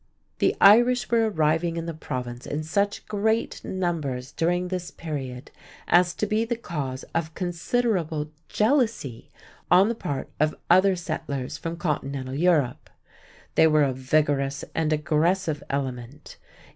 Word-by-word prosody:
The - - +2
Irish 240 +3 +6
were 225 -1 +3
arriving 160 -1 +1
in 165 - -3
the 165 - -4
Province 125 -5 -6
in 150 +2 -3
such 200 +6 -1
great 220 +2 -1
numbers 150 -8 -3
during 175 +2 0
this 180 -1 -3
period 135 -5 -6 0.4
as 175 0 +4
to - - -1
be 215 +1 +1
the 235 +1 -1
cause 145 - -5
of 160 -1 -2
considerable 175 -4 -1 0.2
jealousy 220 - 0 0.4
on 190 +4 +6
the - - +1
part 145 - -5
of 155 +1 +2 0.2
other 185 +2 +5
settlers 140 -6 -4
from 165 0 -4
continental 140 -4 -3
Europe. 150 -5 +1 0.6
They 160 - +5
were 155 -1 +4
a 135 -2 +1
vigorous 140 +1 0
and 160 -1 0
aggressive 155 +1 +1
element. 135 0 -5
160 Hz, 135 wpm, -25 LUFS, 140-190 Hz, 0.6 s, Irish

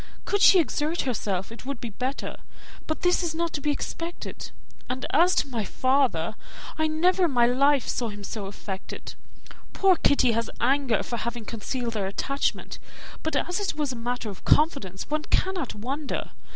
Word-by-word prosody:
Could 405 0 +1
she 380 - +8
exert 315 +2 0
herself, 205 -6 -2
it 230 - -10
would 275 -1 -4
be 235 - -5
better, 260 +6 -3 0.5
but 315 - -3
this 355 +1 +4
is 335 -2 -2
not 335 0 -1
to 285 - -2
be 295 - 0
expected; 335 +4 -4 0.4
and 255 +1 -2
as 355 +2 +5
to - - +2
my 235 -5 -2
father, 255 - +1 0.4
I 315 0 +1
never 355 +4 +3
in 330 - 0
my 240 -2 +5
life 275 +3 +3
saw 235 -2 -1
him 205 -1 -8
so 200 -1 -5
affected. 195 -1 -7 0.6
Poor 385 -1 +5
Kitty 280 -6 +4
has 230 0 -1
anger 260 -3 +2
for 235 - -3
having 235 0 -4
concealed 235 +2 -3
their 200 -3 -1
attachment; 275 +8 -2 0.4
but 315 - -2
as 355 +2 0
it 405 - -1
was 295 -3 -1
a - - -5
matter 240 -1 -3
of 195 - -12
confidence, 245 - +2
one 305 +1 -1
cannot 370 -8 0
wonder. 270 +7 -3
265 Hz, 180 wpm, -26 LUFS, 230-315 Hz, 0.6 s, she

